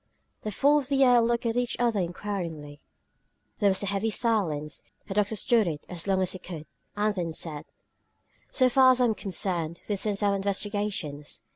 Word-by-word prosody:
The 215 - -4
four 285 +8 +4
on 280 - -5
the 275 -1 +4
earth 245 -1 +6
looked 235 0 0
at 230 0 0
each 245 -1 0
other 235 -3 +1
inquiringly. 170 -5 -4 0.8
There 205 -2 +3
was 190 +1 0
a - - -1
heavy 200 +3 0
silence. 190 -11 0 0.3
The 195 - -4
doctor 210 +1 +1
stood 220 -1 +2
it 150 -3 -4
as 175 0 -7
long 190 -1 +2
as 185 - 0
he 185 - -5
could, 165 -4 -8 0.3
and 210 +1 +1
then 170 -4 -3
said: 155 -2 -5 0.8
"So 255 - +3
far 260 +1 +6
as 255 - -1
I'm 240 -3 +3
concerned, 175 -5 -2
this 205 0 -2
ends 205 0 0
our 200 -1 +3
investigations." 200 -7 -3
200 Hz, 185 wpm, -27 LUFS, 175-225 Hz, 0.8 s, earth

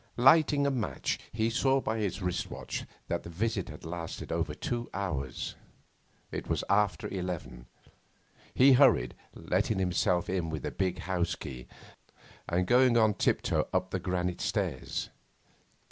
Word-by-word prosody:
Lighting 140 +2 +5
a 140 - +2
match, 120 -5 -2
he 110 +1 0
saw 135 +2 +3
by 110 -3 -2
his 100 -2 -2 0.3
watch - - -5 0.2
that - - -1
the - - -9
visit 100 +3 -1
had 75 +1 -10
lasted 85 0 -5
over - - -1
two 120 0 -3
hours. 80 -10 -3 0.8
It - - -5
was - - 0
after 100 -5 +2
eleven. 90 -10 -5 0.9
He 135 +1 +7
hurried, 125 - +5 0.2
letting 110 - 0
himself 90 -1 +1
in 90 -3 -1
with 80 -3 -4
the - - -2
big 95 -2 -1
house 90 -2 0
key, 65 -3 -8 0.8
and 90 +2 +1
going 125 +2 +5
on 110 -2 +5
tiptoe - - +1
up 95 0 0
the 95 - -1
granite 90 0 -2
stairs. - - -2
95 Hz, 145 wpm, -30 LUFS, 85-115 Hz, 0.9 s, He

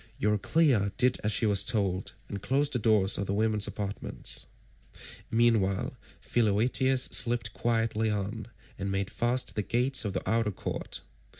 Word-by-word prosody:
Euryclea 105 - +2
did 125 0 +2
as 105 - 0
she 110 - 0
was 100 -2 +4
told 100 -4 -1
and 100 -1 -6
closed 140 +5 0
the 125 - 0
doors 105 -3 +3
of 100 - -3
the 100 - -1
women's 105 -1 +1
apartments. 100 -1 -3 0.8
Meanwhile 110 -5 +1 0.3
Philoetius 120 +4 +2
slipped 120 0 +3
quietly 115 -1 0
out 105 +1 -3 0.3
and 100 0 -3
made 95 0 -2
fast 120 +2 -1
the 105 - 0
gates 125 +5 0
of 100 -3 -3
the - - -4
outer 115 -1 +1
court. 100 - -6
110 Hz, 145 wpm, -28 LUFS, 100-120 Hz, 0.8 s, was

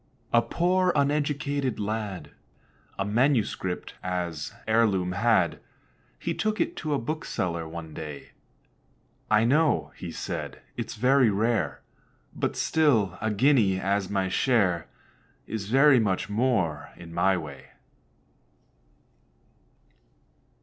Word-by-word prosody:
A 120 - +6
poor 180 +5 +1
uneducated 140 -2 0
lad 105 -6 -4 0.7
A 95 - -1
manuscript 110 -5 0
as 90 -4 -3 0.2
heirloom 105 -5 +2
had. 100 -3 +2 0.6
He - - -3
took 215 +1 -1
it 340 - 0
to 155 -3 -1
a - - 0
bookseller 90 - -3
one 80 -1 -8
day: 75 -2 -8 1.0
"I 110 0 +4
know," 130 - +2 0.2
said - - -5 0.2
he, - - -3
"it's - - -6
very 125 +1 +4
rare; 100 - 0 0.5
But - - -1
still, 115 - +2
a 110 - 0
guinea 105 -4 +3
as 100 0 0
my 95 -2 0
share 95 -5 +1 0.6
Is 105 -3 -5
very 135 +1 +6
much 100 -2 -1
more 105 -10 0
in 85 -1 -11
my 95 +2 +2
way." 70 -6 -8
105 Hz, 110 wpm, -27 LUFS, 90-135 Hz, 1.0 s, A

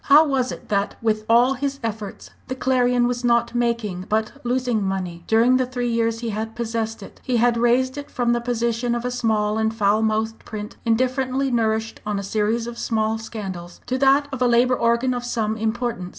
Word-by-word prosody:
How 300 +2 +7
was 265 -3 0
it - - -9
that, 200 -1 0
with 215 -1 -1
all 240 +3 +5
his 275 +1 -3
efforts, 215 -2 -5 0.2
the 260 - -3
Clarion 250 -2 +2
was 245 0 -1
not 235 0 +2
making, 235 -6 -1
but 220 0 0
losing 245 -2 0
money? 185 -3 -3
During 235 +3 +4
the 255 - +1
three 245 -1 -2
years 230 0 0
he 230 -2 -2
had 220 +2 -4
possessed 225 -2 -3
it - - -13
he 250 -2 0
had 240 +1 +3
raised 250 +3 +2
it 285 - -9
from 240 -1 +1
the 240 - 0
position 235 0 -1
of 240 0 -3
a 250 - -1
small 220 -3 0
and 220 0 +1
foul 215 -1 +2
mouthed 220 0 -1
print, 210 0 -7
indifferently 255 +3 +1
nourished 225 -1 0
on 210 -1 -2
a 200 - -3
series 215 +3 0
of 235 0 -7
small 220 -1 0
scandals, 190 -6 -7
to 255 +1 -2
that 275 +1 +4
of 265 -2 -5
a 250 - +4
Labour 245 +1 +4
organ 235 +2 +2
of 245 -1 -3
some 225 -3 -1
importance. 220 -4 -2
235 Hz, 205 wpm, -22 LUFS, 220-245 Hz, 0.2 s, How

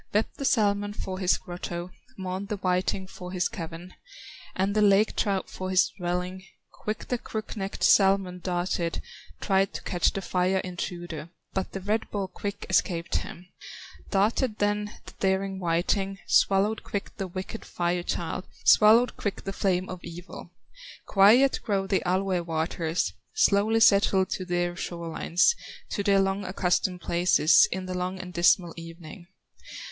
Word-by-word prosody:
Wept 215 - 0
the 275 - -3
salmon 205 -4 +2
for 190 -2 -5
his 185 -2 +3
grotto, 175 0 -6 0.3
Mourned 190 +1 -4
the 210 0 -3
whiting 185 0 0
for 180 -1 -9
his 180 -1 0
cavern, 170 +2 -8 0.6
And 195 +2 0
the 215 - +2
lake 205 +1 +4
trout 195 -2 0
for 185 0 -6
his 185 0 +4
dwelling. 180 +1 -2 0.3
Quick 215 +1 -5
the 245 - 0
crook 220 0 -6
necked 195 -2 -4
salmon 195 -2 +4
darted, 175 -2 -2 0.4
Tried 195 0 +2
to - - -6
catch 175 -2 +1
the 195 - -5
fire 185 +1 +1
intruder, 175 -3 -5 0.2
But 190 -1 -3
the 195 - -4
red 215 +4 -1
ball 200 -2 -2
quick 200 +2 -6
escaped 170 -2 +1
him; 175 - -7 0.6
Darted 215 +3 +1
then 210 0 0
the - - -11
daring 190 0 0
whiting, 190 +3 0
Swallowed 200 +3 +3
quick 200 - -5
the 195 -2 -3
wicked 185 +5 -6
Fire 175 0 -1
child, 175 +1 -3 0.2
Swallowed 225 +3 +6
quick 200 -2 -3
the 195 - -4
flame 185 -2 0
of 185 -1 -8
evil. 175 +2 -9 0.6
Quiet 225 +8 +5
grow 195 -3 0
the 190 0 +1
Alue 185 0 +1
waters, 165 0 -1 0.2
Slowly 215 - +3
settle 200 -2 +5
to 185 0 -4
their 175 0 -1
shore 170 -1 -5
lines, 175 - +2 0.4
To - - -1
their 200 -1 +3
long 195 +1 0
accustomed 180 -1 0
places, 170 -2 +4
In 185 0 -3
the 185 - -4
long 180 +1 -3
and 185 -1 -8
dismal 170 0 +3
evening. 165 +1 -10
190 Hz, 155 wpm, -27 LUFS, 175-200 Hz, 0.6 s, Swallowed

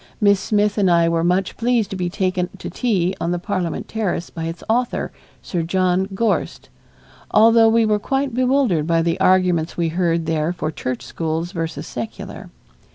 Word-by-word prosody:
Miss 200 -2 +4
Smith 210 +1 +1
and 195 -2 +3
I 170 -1 +4
were 165 0 +1
much 180 +2 0
pleased 235 -3 +1
to - - -3
be 180 -2 -2
taken 185 -1 -1
to - - -7
tea 190 -7 0
on 170 - 0
the 175 - 0
Parliament 175 -1 -3
terrace 205 -6 -2
by 165 -1 -5
its 165 +1 -6
author, 240 +2 0 0.3
Sir 175 - -2
John 185 +2 +1
Gorst, 230 +2 -1 0.6
although 225 +1 +6
we 230 0 +3
were 210 -1 +2
quite 270 +3 -1
bewildered 250 - +2
by 165 -1 +2
the 170 0 0
arguments 180 -3 +2
we 170 -1 +1
heard 170 -1 0
there 160 +1 0
for 155 -3 -3
church 130 -5 -4
schools 165 +1 -3
versus 165 -3 -4
secular. 120 -2 -7
180 Hz, 175 wpm, -20 LUFS, 165-210 Hz, 0.6 s, although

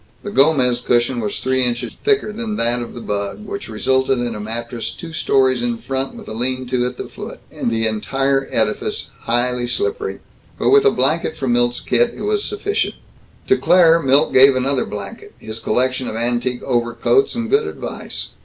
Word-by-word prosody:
The 205 - -5
Gomez 135 -7 +3
cushion 120 0 +1
was 105 -3 -3
three 130 0 +1
inches 120 -1 -1
thicker 410 - +1
than 220 -1 -3
that 120 - +1
of 120 - -7
the 120 - -7
bug, 100 - -4
which 200 - -6
resulted 130 +4 +1
in 120 -1 -2
a 105 - -6
mattress 115 +2 -4
two 165 -1 -9
stories 130 -5 +2
in 120 -1 -1
front 135 +2 -3
with - - -11
a - - -6
lean 130 +3 -2
to 125 -1 +1
at 125 0 -7
the - - -5
foot, - - -9
and - - -2
the 115 -1 0
entire 135 +5 0
edifice 110 -1 -1
highly 120 +1 +1
slippery. 420 - -2 0.4
But - - +1
with 420 +1 +6
a 420 - +6
blanket 160 - 0
from 130 -5 0
Milt's 120 0 +1
kit, 120 -1 +1
it - - -6
was 420 0 0
sufficient. 410 0 -1 0.5
To 390 - +4
Claire, 170 -2 +5
Milt 140 +1 +3
gave 135 +1 +7
another 130 +1 +1
blanket, 100 -1 -8
his 110 +1 -7
collection 130 +3 0
of - - -4
antique 120 +2 -1
overcoats, 120 - +1
and 235 -1 -2
good 425 +1 +2
advice. - - -6
130 Hz, 190 wpm, -19 LUFS, 120-160 Hz, 0.5 s, gave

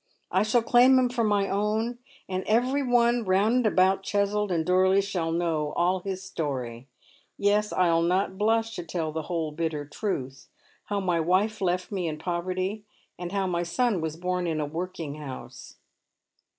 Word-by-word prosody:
I - - +3
shall 220 +2 +2
claim 250 +3 +6
him 255 -1 +3
for 240 -1 -1
my 205 -2 +2
own, 215 +4 -1 0.3
and 185 0 -2
every 250 +6 +2
one 240 -2 +3
round 200 +4 +2
and 250 - +1
about 190 -1 +3
Cheswold 205 0 0
and 165 -2 0
Dorley 185 +1 +4
shall 185 -5 -1
know 165 -3 -1
all 180 +2 +1
his 190 0 -5
story. 130 -9 -4 0.5
Yes, 210 +1 +2
I 180 -2 +2
will 165 - +3
not 185 +3 +1
blush 225 +2 +1
to 175 - -4
tell 160 -1 -3
the 160 +1 -3
whole 165 -3 -1
bitter 155 -1 -3
truth. 135 -6 -4 0.4
How 205 -1 -1
my 175 -3 +1
wife 190 +7 +1
left 180 +1 -1
me 185 -4 -2
in 155 -1 -3
poveity, 185 +5 -2 0.4
and 175 -1 -5
how 195 -1 0
my 175 -2 -1
son 185 +3 0
was 160 0 -3
born 180 0 -1
in 160 -2 -1
a 150 - 0
workhouse." 155 -4 -7
185 Hz, 175 wpm, -27 LUFS, 165-210 Hz, 0.5 s, claim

